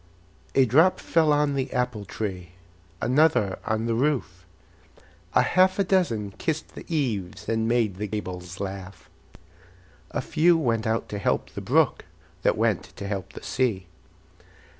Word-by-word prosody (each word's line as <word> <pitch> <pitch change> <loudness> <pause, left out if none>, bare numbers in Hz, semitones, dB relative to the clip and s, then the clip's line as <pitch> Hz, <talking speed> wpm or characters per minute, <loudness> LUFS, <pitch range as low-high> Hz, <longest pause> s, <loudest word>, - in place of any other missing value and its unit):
A 135 - +6
drop 160 +9 +4
fell 160 -2 +2
on 145 -1 +2
the 135 -1 -2
apple 125 -5 -1
tree, 90 -4 -5 0.5
Another 130 -7 +3
on 110 0 0
the 115 - 0
roof; 115 -9 -1 0.9
A - - +6
half 185 +1 +3
a 200 - +3
dozen 165 - +1
kissed 155 -1 -2
the - - -10
eaves, 105 - -2
And 110 0 0
made 115 -5 +1
the 105 +2 -3
gables 90 -3 -6
laugh. 95 -2 -7 1.0
A - - -3
few 170 +2 +3
went 115 -7 0
out 110 +1 0
to 105 - -4
help - - 0
the - - -6
brook, - - +2 0.4
That - - +2
went - - +1
to 100 - -7
help 100 -2 -4
the - - -10
sea. 115 -8 0
115 Hz, 150 wpm, -25 LUFS, 100-145 Hz, 1.0 s, A